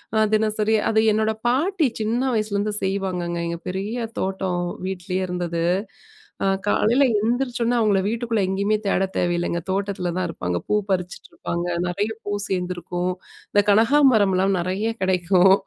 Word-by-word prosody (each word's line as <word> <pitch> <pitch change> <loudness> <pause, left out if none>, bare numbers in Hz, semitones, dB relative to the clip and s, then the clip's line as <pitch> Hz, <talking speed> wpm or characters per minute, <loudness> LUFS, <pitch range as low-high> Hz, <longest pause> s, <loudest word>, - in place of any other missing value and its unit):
அ 220 0 +4
தினசரி 215 0 +1
அது 220 0 +4
என்னோட 220 +1 +1 0.2
பாட்டி 320 +4 +2
சின்ன 225 +3 0
வயசுலருந்து 210 -1 -1
செய்வாங்கங்க. 185 -3 -2
எங்க 170 0 -4
பெரிய 195 +6 -3 0.2
தோட்டம். 190 -2 -1 0.2
வீட்லயே 185 0 -3
இருந்தது, 175 -2 -2 0.8
அ 195 - +2 0.2
காலையில 235 +6 +3 0.2
எழுந்திரிச்சோனே 240 +1 0
அவுங்கள 210 -4 +3
வீட்டுக்குள்ள 230 0 -1
எங்கயுமே 200 +3 +1
தேட 195 -1 +2
தேவையில்லங்க. 175 -1 0
தோட்டத்துல 190 -2 -1
தான் 185 - 0
இருப்பாங்க, 90 - -3
பூ - - +2
பறிச்சுட்டுருப்பாங்க, 180 -1 -3 0.2
நெறைய 205 +5 -1
பூ 205 - -3 0.2
சேந்திருக்கும். 180 -1 -2 0.4
இந்த 205 - +4
கனகாம்பரம்லாம் 210 -5 +4
நெறைய 190 +5 -1
கிடைக்கும். 185 0 +4
195 Hz, 125 wpm, -23 LUFS, 180-220 Hz, 0.8 s, அ